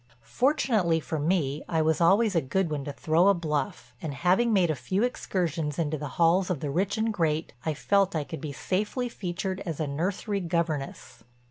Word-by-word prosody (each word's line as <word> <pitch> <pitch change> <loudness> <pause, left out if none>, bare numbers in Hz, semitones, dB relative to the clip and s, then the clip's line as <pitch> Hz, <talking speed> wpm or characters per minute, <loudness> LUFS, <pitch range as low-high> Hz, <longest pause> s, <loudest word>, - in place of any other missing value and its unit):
Fortunately 215 - +2
for 160 0 -4
me, 150 -3 0
I 160 -1 +2
was 160 +1 +1
always 200 +4 +4
a 165 - +4
good 165 +5 -1
one 145 -2 -2
to 145 - -4
throw 160 +5 +2
a 200 - +5
bluff 150 -5 -3
and, 150 -4 -4
having 185 +10 +2
made 185 -6 +3
a - - -1
few 165 - -1
excursions 165 - -1
into 155 -2 0
the 150 -1 -5
halls 175 +3 +3
of 180 -6 -1
the 145 0 -3
rich 195 +7 0
and 220 0 0
great, 160 - 0
I 155 - 0
felt 195 +3 +2
I 155 - 0
could 160 +2 -7
be 155 -3 -4
safely 210 - -2
featured 185 -2 -4
as 165 -6 -5
a 155 - 0
nursery 185 +8 -2
governess. 165 -5 -3
170 Hz, 200 wpm, -27 LUFS, 150-195 Hz, -, a